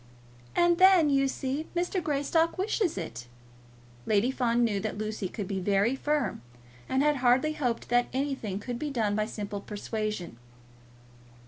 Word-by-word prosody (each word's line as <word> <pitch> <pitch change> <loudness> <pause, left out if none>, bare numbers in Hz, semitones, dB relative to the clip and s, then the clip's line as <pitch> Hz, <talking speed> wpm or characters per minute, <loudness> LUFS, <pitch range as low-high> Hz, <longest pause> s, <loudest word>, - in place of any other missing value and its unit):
"And 345 0 +3
then, 370 -5 +6
you 275 0 +3
see, 270 +3 -3
Mr. 355 +2 0
Greystock 310 +4 +1
wishes 385 - 0
it." 120 -9 -6 0.8
Lady 215 +4 +3
Fawn 240 -2 +1
knew 210 -4 +1
that 210 0 -4
Lucy 215 -3 -3
could 205 -1 -5
be 195 -1 -2
very 200 +6 +2
firm, 290 - -1 0.5
and 265 +1 +2
had 300 -1 +3
hardly 255 +4 +3
hoped 245 -6 -2
that 245 0 +3
anything 265 -7 -2
could 240 +3 -5
be 300 - -2
done 220 -7 0
by 215 0 0
simple 205 -2 -5
persuasion. 210 - -4
245 Hz, 150 wpm, -28 LUFS, 210-295 Hz, 0.8 s, then